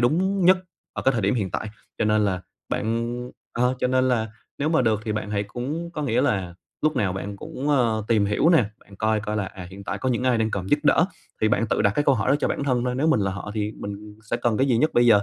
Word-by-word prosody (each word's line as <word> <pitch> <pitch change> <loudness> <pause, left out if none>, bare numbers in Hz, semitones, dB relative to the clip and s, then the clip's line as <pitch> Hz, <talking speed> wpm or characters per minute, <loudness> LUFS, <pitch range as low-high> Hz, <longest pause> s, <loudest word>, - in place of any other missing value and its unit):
đúng 185 +9 +2
nhất 185 +1 +6 0.3
ở - - -4
cái 135 - +4
thời 115 - 0
điểm 100 +5 +2
hiện 100 -6 -1
tại. 105 - -3 0.3
Cho - - +1
nên 105 0 +3
là 95 -2 0 0.3
bạn 120 +2 -2 0.2
ờ, 125 +2 +1
cho - - +1
nên 130 0 +2
là 110 -3 +1 0.3
nếu 145 +2 0
mà 160 -5 +3
được 110 -2 +2
thì 110 - -1
bạn 110 -1 -3
hãy 100 -1 0
cũng 140 +11 -4
có 155 -3 -4
nghĩa 120 -5 +1
là 90 -4 0 0.3
lúc 155 -2 +2
nào 95 -6 +1
bạn 100 +1 -5
cũng, 140 +8 -5
ơ, 115 -7 +2
tìm 110 -3 +3
hiểu 105 +10 +2
nè, 165 -9 +5
bạn 100 -1 -17
coi 110 0 +1
coi 105 0 -3
là, 100 - 0
à, 95 -1 -8
hiện 100 +1 -10
tại - - -3
có 130 - -1
những 125 0 0
ai 125 -2 +3
đang 110 0 +1
cần 95 -2 -3
giúp 145 - +4
đỡ 160 - +5 0.4
thì 110 - +3
bạn 115 +2 +1
tự 105 - +1
đặt 100 - +4
cái 145 - +2
câu 140 - +5
hỏi 110 - -1
đó - - +5
cho - - +1
bản - - -2
thân 125 -3 +1
thôi, 125 0 -1
nếu 140 +5 +1
mình 155 -9 +3
là 95 -1 +1
họ 95 +1 -6
thì 105 0 -1
mình 105 +1 -7
sẽ - - +2
cần 120 -2 0
cái 135 - +2
gì 125 -4 +3
nhất 155 +7 +2
bây 120 0 +5
giờ. 105 -3 +7
115 Hz, 290 wpm, -24 LUFS, 105-130 Hz, 0.4 s, giờ